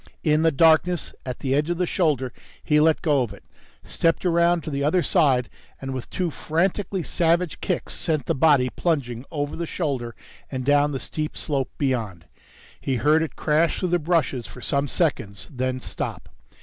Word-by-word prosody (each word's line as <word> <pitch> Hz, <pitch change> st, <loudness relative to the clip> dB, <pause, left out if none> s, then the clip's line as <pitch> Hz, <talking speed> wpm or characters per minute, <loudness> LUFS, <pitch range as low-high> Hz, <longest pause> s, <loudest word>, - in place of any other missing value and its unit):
In 155 Hz, -1 st, +3 dB
the 165 Hz, 0 st, +4 dB
darkness 165 Hz, +3 st, +3 dB
at 125 Hz, -, -5 dB
the 135 Hz, -1 st, 0 dB
edge 150 Hz, +3 st, +1 dB
of 175 Hz, -, 0 dB
the 180 Hz, -, +1 dB
shoulder, 145 Hz, -, 0 dB, 0.3 s
he 150 Hz, -1 st, +3 dB
let 160 Hz, +1 st, +3 dB
go 145 Hz, -4 st, +3 dB
of 120 Hz, -, -3 dB
it, -, -, -18 dB, 0.4 s
stepped 165 Hz, +2 st, 0 dB
around 170 Hz, -1 st, +3 dB
to 155 Hz, -, -5 dB
the 140 Hz, 0 st, -1 dB
other 165 Hz, +4 st, +2 dB
side 130 Hz, -6 st, +3 dB, 0.3 s
and 135 Hz, 0 st, -5 dB
with 130 Hz, -2 st, -6 dB
two 180 Hz, -3 st, -2 dB
frantically 185 Hz, +5 st, -1 dB
savage 170 Hz, +1 st, 0 dB
kicks 180 Hz, -, -2 dB
sent 155 Hz, -6 st, -1 dB
the -, -, +1 dB
body 135 Hz, -3 st, +4 dB
plunging 130 Hz, -7 st, -1 dB
over 145 Hz, -2 st, -3 dB
the 170 Hz, 0 st, -4 dB
shoulder 130 Hz, -10 st, -3 dB, 0.3 s
and 130 Hz, -2 st, -4 dB
down 145 Hz, +1 st, +4 dB
the 135 Hz, -, -3 dB
steep 155 Hz, +3 st, -4 dB
slope 140 Hz, -4 st, -2 dB
beyond. 115 Hz, -, -2 dB, 0.6 s
He 135 Hz, -, -1 dB
heard 150 Hz, +5 st, +3 dB
it 160 Hz, -, -3 dB
crash 155 Hz, +2 st, +1 dB
through 185 Hz, -, -1 dB
the 175 Hz, 0 st, +2 dB
bushes 155 Hz, -7 st, 0 dB
for -, -, -11 dB
some 140 Hz, +5 st, 0 dB
seconds, 105 Hz, -, -1 dB
then 130 Hz, 0 st, -2 dB
stop. -, -, -5 dB
150 Hz, 185 wpm, -24 LUFS, 130-165 Hz, 0.6 s, the